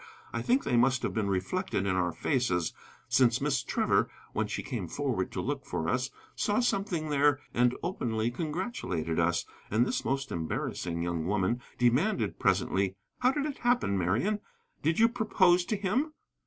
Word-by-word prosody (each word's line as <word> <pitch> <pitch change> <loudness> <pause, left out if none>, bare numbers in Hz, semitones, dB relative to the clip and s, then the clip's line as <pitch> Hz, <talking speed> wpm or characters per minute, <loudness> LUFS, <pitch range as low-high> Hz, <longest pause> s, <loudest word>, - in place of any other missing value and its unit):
I - - -1
think 255 +3 +2
they 120 - +1
must 130 +1 +3
have - - -1
been 110 -3 0
reflected 100 - -1
in 95 -2 +1
our 90 -1 +1
faces, 90 - 0 0.3
since 125 -1 +4
Miss 140 -2 +1
Trevor, - - +1 0.2
when - - 0
she - - -3
came - - -4
forward - - -1
to - - -3
look - - -2
for 80 - -3
us, 125 +9 0 0.3
saw 205 +2 +1
something 195 -9 0
there 145 -1 +3
and 125 0 +3
openly 120 - -1
congratulated 150 - -2
us. 85 +1 +2 0.2
And 110 +4 +3
this - - -1
most 135 0 -1
embarrassing 85 +1 -2
young 85 -1 -2
woman 105 +4 +1 0.2
demanded 135 - +2
presently: 95 0 +1 0.2
"How 250 +1 +4
did 285 +1 -1
it 295 -3 -4
happen, 240 - +2
Marian? 110 - +1 0.4
Did 160 +2 +1
you 225 - +6
propose 190 -7 +3
to 215 - 0
him?" 240 +11 0
130 Hz, 170 wpm, -30 LUFS, -, 0.4 s, you